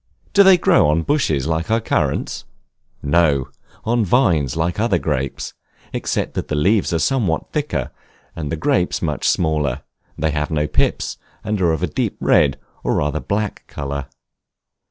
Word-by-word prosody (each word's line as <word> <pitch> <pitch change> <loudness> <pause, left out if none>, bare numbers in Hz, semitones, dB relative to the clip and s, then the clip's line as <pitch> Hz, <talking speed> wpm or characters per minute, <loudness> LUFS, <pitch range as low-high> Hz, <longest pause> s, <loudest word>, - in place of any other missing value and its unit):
Do 200 - +7
they 190 -2 +7
grow 175 - +4
on 80 +2 +2
bushes 80 - +1
like 80 +4 -1
our 115 +1 +3
Currants? - - -1 0.6
No, 70 -4 +2 0.4
on 120 0 +2
vines 85 - +2
like 85 +4 -1
other 110 -5 +2
grapes, 70 -5 -3 0.4
except - - -2
that - - -3
the 75 - -2
leaves 95 +8 +2
are 85 - +1
somewhat 100 -6 0
thicker, 150 -1 -2 0.4
and 75 -2 -4
the - - 0
grapes 80 - 0
much - - 0
smaller: 75 -5 0 0.3
they 80 +1 0
have 75 0 -1
no 75 -1 0
pips, 75 - 0 0.3
and 105 -2 -2
are 85 -2 +3
of 80 - -2
a - - +2
deep - - -2
red, 70 -3 +3 0.3
or - - +1
rather 75 +1 0
black 105 +3 -3
color. 70 -1 -5
80 Hz, 160 wpm, -20 LUFS, 75-105 Hz, 0.6 s, Do